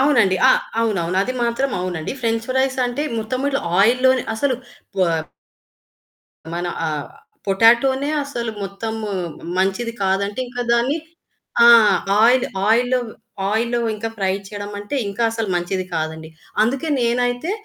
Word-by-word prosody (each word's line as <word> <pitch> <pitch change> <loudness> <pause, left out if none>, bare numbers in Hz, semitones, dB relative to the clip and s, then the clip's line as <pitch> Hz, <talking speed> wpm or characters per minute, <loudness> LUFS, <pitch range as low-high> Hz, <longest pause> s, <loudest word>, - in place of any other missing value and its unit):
అవునండి. 225 -10 +4
అ - - +8 0.3
అవునవును. 185 -5 0
అది 255 - -2
మాత్రం 235 +3 0
అవునండి. 175 -1 -3
ఫ్రెంచ్ 225 0 0
ఫ్రైస్ 260 0 +1
అంటే, 245 +5 -3 0.2
మొత్తం 255 +5 -2
ఇట్లా 275 - -1 0.2
ఆయిల్ 235 +5 +4
లోనే 260 -2 +4
అసలు 255 +2 0 0.4
పొప్ 165 -4 0 1.2
మన 175 +1 -2 0.2
ఆహ్, 150 -2 -3 0.4
పొటాటోనే 240 +7 +4 0.2
అసలు 235 -5 -4
మొత్తం 200 +3 -4 0.6
మంచిది 200 +5 0
కాదంటే, 200 +4 0
ఇంకా 245 0 -4
దాన్ని 245 +6 +2 0.7
ఆ! 235 - +9 0.5
ఆయిల్ 250 +2 +5 0.2
ఆయిల్‌లో 245 +3 +3 0.5
ఆయిల్‌‌లో 235 +3 0 0.2
ఇంకా 225 +2 -4
ఫ్రై 190 -1 +1 0.2
చేయడం 205 -1 -6
అంటే, 205 +8 -4
ఇంకా 200 +4 -3
అసలు 225 -3 -2
మంచిది 180 +2 -1
కాదండి. 160 0 -3 0.3
అందుకే 270 +7 0
నేనైతే 245 +5 0
230 Hz, 130 wpm, -20 LUFS, 195-255 Hz, 1.2 s, ఆ